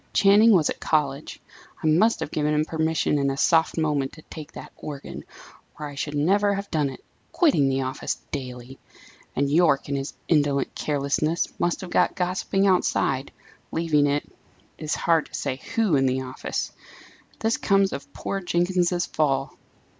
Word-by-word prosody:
"Channing 205 +3 +6
was 175 -7 +4
at - - -6
college 145 -2 -1 0.4
I - - -2
must 175 +9 +3
have - - -4
given 150 0 0
him 150 +1 +2
permission 160 -2 0
in 140 0 +1
a 135 - -3
soft 160 +3 +3
moment 150 -4 0
to 155 - -13
take 155 -1 -10
that - - -9
organ, 145 -2 -8 0.6
or 150 - -4
I 145 - -7
should 145 +1 -4
never 200 +7 +2
have 200 +1 -6
done 150 -4 +1
it, 130 - -11 0.3
quitting 270 - +3
the 135 0 0
office 130 0 -3 0.2
daily! 125 0 -6 0.6
and, 140 +1 +1
Yorke, 150 -2 +3
in 140 - -1
his 135 +1 -4
indolent 145 -4 +1
carelessness, 150 +3 -1
must 175 - 0
have 185 -2 -8
got 180 - +2
gossiping 185 +2 0
outside, 140 -7 +1 0.4
leaving, 155 -3 +2
it 145 +1 -1 0.5
is 155 -1 -2
hard 165 -2 +2
to - - -9
say 135 -2 -2 0.2
who, 220 -9 +3
in 135 -1 +3
the 130 +1 0
office! 130 0 -4 0.7
This 225 +1 0
comes 195 -1 +2
of 140 0 -7
poor 195 +6 -4
Jenkins's 175 0 +1
fall!" 135 -3 0
155 Hz, 170 wpm, -24 LUFS, 140-175 Hz, 0.7 s, Channing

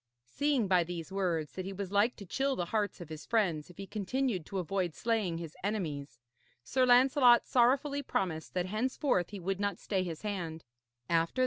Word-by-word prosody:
Seeing 270 - +1
by 180 -2 +4
these 170 +1 -6
words 175 -6 -1
that 185 - -4
he 195 +1 -5
was 195 -1 -5
like 205 +4 +3
to 200 - -10
chill 270 +8 0
the 175 - -1
hearts 205 0 -1
of 170 - -8
his 155 -1 -7
friends 180 -10 0
if 180 - -15
he 195 - -6
continued 210 - -2
to 195 - -4
avoid 180 -1 -1
slaying 220 -7 0
his 165 -2 -7
enemies, 150 - -3 0.4
Sir 255 - +2
Lancelot 250 0 +6
sorrowfully 275 +4 +3
promised 180 - -2
that 180 -1 +1
henceforth 215 - 0
he 205 - -7
would 190 +2 -2
not 200 -3 -1
stay 195 -3 -1
his 170 -2 -5
hand. 170 -6 -4
195 Hz, 185 wpm, -32 LUFS, 175-235 Hz, 0.4 s, Lancelot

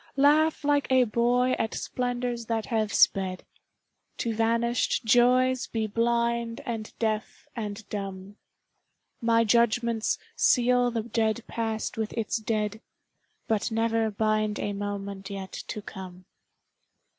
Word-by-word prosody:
Laugh 300 +3 +4
like 290 -2 +1
a 260 -1 +6
boy 245 +2 +2
at 225 - -1
splendors 245 -2 -3
that 225 -2 -1
have 220 -3 -1
sped, 185 -2 +2 0.7
To 230 -2 -1
vanished 230 +2 +1
joys 250 +2 +4
be 225 -1 -2
blind 235 +1 0
and 225 -4 -4
deaf 215 -2 -2
and 210 -2 -5
dumb; 195 0 -6 0.8
My 230 0 +3
judgments 235 0 +2 0.2
seal 245 0 +3
the 230 -2 -2
dead 225 0 0
past 225 -1 -3
with 220 -1 -2
its 225 -1 -1
dead, 215 -1 -2 0.7
But 220 0 0
never 225 0 +1
bind 215 0 0
a 205 - -2
moment 200 -1 -5
yet 195 -1 -6 0.2
to 210 -2 -5
come. 185 -2 -9
225 Hz, 120 wpm, -27 LUFS, 215-240 Hz, 0.8 s, a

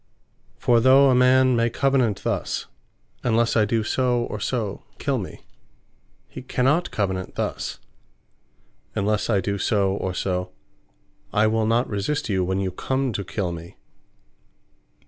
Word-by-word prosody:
For 120 -1 +3
though 135 +3 +6
a - - +4
man 130 0 +5
may 115 0 +2
Covenant 130 -4 +1
thus, - - -2 0.6
"Unlesse 115 -1 +2
I 110 -2 +4
do 110 +1 0
so, 125 +1 +1
or 105 - -5
so, 110 -3 -3
kill - - -1
me;" - - -8 0.9
he - - -9
cannot 135 +7 +1
Covenant 95 -3 -2
thus - - -3 1.2
"Unless 105 +2 0
I 100 -4 +3
do 100 +2 -2
so, 100 -3 +1
or 95 -2 -3
so, 90 -1 -2 0.8
I 105 +1 +3
will 110 0 +1
not 115 +3 +2
resist 110 +7 -2
you, 95 -2 +1
when 95 +1 -1
you 95 -1 -1
come 130 +6 -1
to 100 - -3
kill 95 -1 -3
me." 85 0 -9
110 Hz, 145 wpm, -23 LUFS, 100-125 Hz, 1.2 s, though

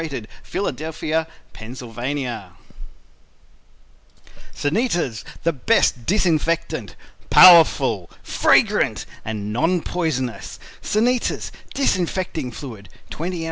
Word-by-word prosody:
Philadelphia. 160 -1 -3 0.3
Pa. 120 -2 -5 2.0
SANITAS 160 - -1 0.2
THE 170 - +1
BEST 130 - +1
DISINFECTANT 170 -4 0 0.3
Powerful, 140 - +7
Fragrant - - +2 0.2
and 105 -1 -4
Non 165 +8 +1
poisonous 135 -9 -3 0.2
"Sanitas" 240 +3 0 0.2
Disinfecting 180 - -1
Fluid, 115 -5 -9 0.2
20 175 +3 -4
oz. - - -5
155 Hz, 70 wpm, -21 LUFS, 120-175 Hz, 2.0 s, Powerful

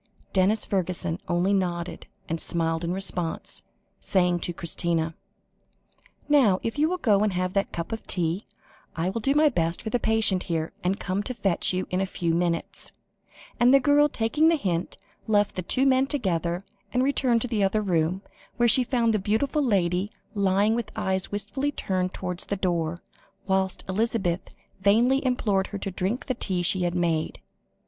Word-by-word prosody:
Denis 200 +3 +2
Fergusson 180 -2 -2
only 175 +3 +1
nodded 175 -3 -2 0.2
and 165 0 -2
smiled 165 -1 0
in 170 - -1
response, 180 -3 -1 0.4
saying 180 -2 +2
to 175 - -2
Christina 165 -1 -1 1.1
"Now, 265 -11 +5
if 230 +5 -3
you 310 +2 +3
will 365 - -1
go 215 - +3
and 210 -1 +1
have 185 0 -1
that 195 0 0
cup 170 -1 -5
of 225 - -5
tea, 175 +2 -1 0.5
I 165 +3 0
will 230 - -3
do 275 +5 +1
my 305 +1 +5
best 170 - 0
for 220 - -4
the 245 - +1
patient 215 -5 +2
here, 165 -3 -3
and 185 +2 0
come 190 +1 -2
to 250 +4 -5
fetch 195 -6 +1
you 185 0 -1
in 185 +1 0
a 195 - 0
few 170 -3 -1
minutes"; 170 0 -1 0.7
and 245 +1 +6
the 275 - +7
girl, 290 +1 +4
taking 285 +7 +2
the 330 - +5
hint, 180 - -2 0.3
left 205 -2 +2
the 185 - -3
two 255 +9 +2
men 265 0 +3
together, 180 - -1 0.3
and 250 0 +1
returned 255 -4 +2
to - - -2
the 220 -4 0
other 210 +2 +1
room, 180 0 0 0.3
where 240 -1 +4
she 255 +2 +5
found 235 -3 +1
the 215 - +1
beautiful 225 +10 0
lady 190 -3 +1 0.2
lying 200 +1 +2
with 235 -1 -3
eyes 190 -3 -1
wistfully 215 +8 -2
turned 185 -8 -1
towards 180 -1 -4
the 200 - -2
door, 170 -2 -1 0.4
whilst 190 -1 0
Elizabeth 190 -3 -1 0.2
vainly 235 +8 +3
implored 210 -7 +1
her 205 - -5
to 195 0 -4
drink 190 +7 -2
the 255 - -1
tea 185 -7 -1
she 185 +2 +2
had 175 0 0
made. 165 -3 0
195 Hz, 180 wpm, -26 LUFS, 175-230 Hz, 1.1 s, the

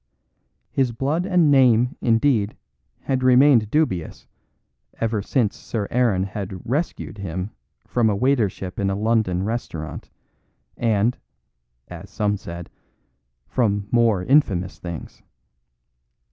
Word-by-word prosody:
His 130 -3 +1
blood 145 +9 -1
and 175 -6 +4
name, 125 -2 +4
indeed, 115 -2 +2 0.4
had 130 -1 -1
remained 130 -3 +5
dubious, 105 - -1 0.7
ever 110 -2 0
since 110 0 0
Sir 105 -3 -4
Aaron 115 -7 +2
had 95 -2 -6
"rescued" 135 -4 -3
him 95 +1 -4 0.3
from 120 -3 +1
a 105 - +1
waitership 105 -7 0
in 100 -1 +1
a 95 - -1
London 105 -4 +1
restaurant, 100 -8 -5 0.7
and 115 +1 +1 0.7
(as - - -10
some 105 -1 0
said) 85 -3 -8 0.8
from 105 -4 0
more 115 -6 +3
infamous 95 -9 +2
things. 85 -3 -8
110 Hz, 110 wpm, -22 LUFS, 100-130 Hz, 0.8 s, remained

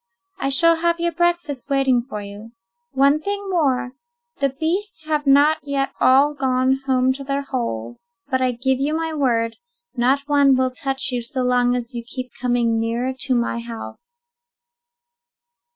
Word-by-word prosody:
I 275 - -1
shall 335 +4 +6
have 340 +1 0
your 340 0 0
breakfast 345 -5 -1
waiting 270 -3 +2
for 210 -3 -5
you. 205 +3 -11 0.4
One 280 +3 +3
thing 405 +2 -4
more: 265 -7 +1 0.5
the 275 -1 +2
beasts 320 +5 -3
have 300 -2 -1
not 285 +3 +5
yet 275 -1 -2
all 275 +3 +4
gone 265 -1 +1
home 260 0 +2
to 275 +1 -8
their 275 +1 -2
holes; 235 - -5 0.2
but 260 -2 0
I 255 -1 +2
give 260 +2 0
you 295 +3 0
my 325 0 -2
word, 230 -6 0 0.4
not 260 +3 +2
one 285 -2 +4
will 260 0 +1
touch 270 +1 -2
you 245 -1 -2
so 255 +2 -3
long 245 0 +2
as 245 +1 -4
you 235 -1 -5
keep 250 +1 -7
coming 240 -2 +1
nearer 235 +3 -1
to 260 -1 +1
my 235 0 -1
house." 480 - -10
265 Hz, 165 wpm, -21 LUFS, 245-295 Hz, 0.5 s, shall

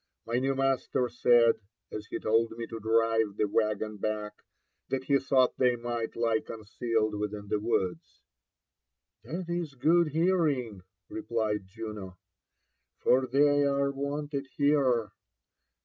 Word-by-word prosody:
My 115 +2 0
new 135 +1 0
master 135 -2 0
said, 120 -1 +4 0.3
as 105 0 -6
he - - -4
told 115 +1 +1
me 115 - -4
to 115 0 -7
drive 110 -1 +1
the 105 - +2
waggon 105 0 -1
back, 105 0 -3 0.6
that 130 -1 -1
he 140 +1 +3
thought 130 -1 +2
they 125 -1 +4
might 120 -1 -4
lie 115 -1 +1
concealed 110 0 -2
within 105 -1 -4
the 105 - +1
woods." 95 -6 -2 0.5
*' - - -56
That 175 +3 -4
is 170 -5 -3
good 165 +6 +3
hearing/' 150 - +1 0.3
replied 110 -3 -2
Juno, 105 -3 -8 0.4
'' - - -51
for 130 +1 +4
they 145 +2 +4
are 140 0 +1
wanted 140 0 -4
here. 135 -7 +2
115 Hz, 135 wpm, -29 LUFS, 110-140 Hz, 0.6 s, said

